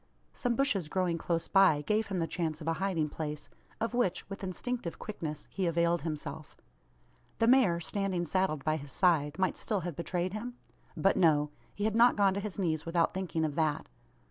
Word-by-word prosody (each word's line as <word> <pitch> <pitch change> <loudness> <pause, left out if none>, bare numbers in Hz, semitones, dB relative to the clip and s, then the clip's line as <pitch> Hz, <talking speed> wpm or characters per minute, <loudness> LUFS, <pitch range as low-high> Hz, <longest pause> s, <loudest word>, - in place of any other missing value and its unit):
Some 245 -2 -1
bushes 230 - +1
growing 180 -2 0
close 165 -1 -1
by 185 -7 +5
gave 215 +6 +1
him 195 - -3
the 165 - +1
chance 160 -2 -3
of 160 - -8
a 165 - +2
hiding 180 -6 +1
place; 150 -1 -5 0.3
of 230 +1 -1
which, 240 -7 0
with 195 - -6
instinctive 190 0 -3
quickness, 155 -8 -6
he 190 -2 -1
availed 170 0 +2
himself. 155 -1 -6 0.8
The 225 - +3
mare, 230 -9 +5
standing 185 0 -1
saddled 170 -4 0
by 155 0 +2
his 140 -2 -9
side, 155 -5 +2
might 190 -1 0
still 210 -4 -1
have 175 -2 -4
betrayed 180 +2 -2
him? 240 +3 -5 0.4
But, 195 - +3
no. 150 -4 +3 0.2
He 205 - -3
had 215 0 +1
not 240 +1 +6
gone 200 -2 +3
to 200 - -2
his 205 -1 -5
knees, 160 -5 0
without 165 0 +1
thinking 180 -4 -1
of 150 - -2
that. 155 -1 0
175 Hz, 195 wpm, -31 LUFS, 155-195 Hz, 0.8 s, not